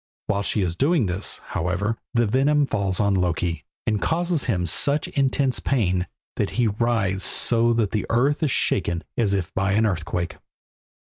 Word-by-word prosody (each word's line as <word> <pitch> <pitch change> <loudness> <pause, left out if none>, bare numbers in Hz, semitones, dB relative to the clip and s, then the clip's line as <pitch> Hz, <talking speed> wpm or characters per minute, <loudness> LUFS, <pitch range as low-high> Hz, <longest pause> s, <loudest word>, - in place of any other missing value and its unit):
While 100 0 0
she 100 0 0
is 85 -2 -2
doing 145 - +2
this, 95 +2 -2
however, 90 +6 -1 0.2
the 120 0 +4
venom 140 +6 +3
falls 100 -7 -1
on 100 -1 +2
Loki, 90 -2 -1 0.2
and 105 -2 0
causes 170 -2 0
him 90 -2 0
such 140 - +1
intense 135 -1 +1
pain 95 -9 0 0.3
that - - 0
he 120 - +3
writhes 105 -3 0
so 115 0 +2
that 115 -4 +1
the 105 - -1
earth 135 +7 +2
is 155 - +2
shaken 85 -8 0
as 105 -4 +1
if 90 -4 -3
by 100 0 0
an 110 +2 +3
earthquake. 90 -2 -2
105 Hz, 165 wpm, -23 LUFS, 95-130 Hz, 0.3 s, the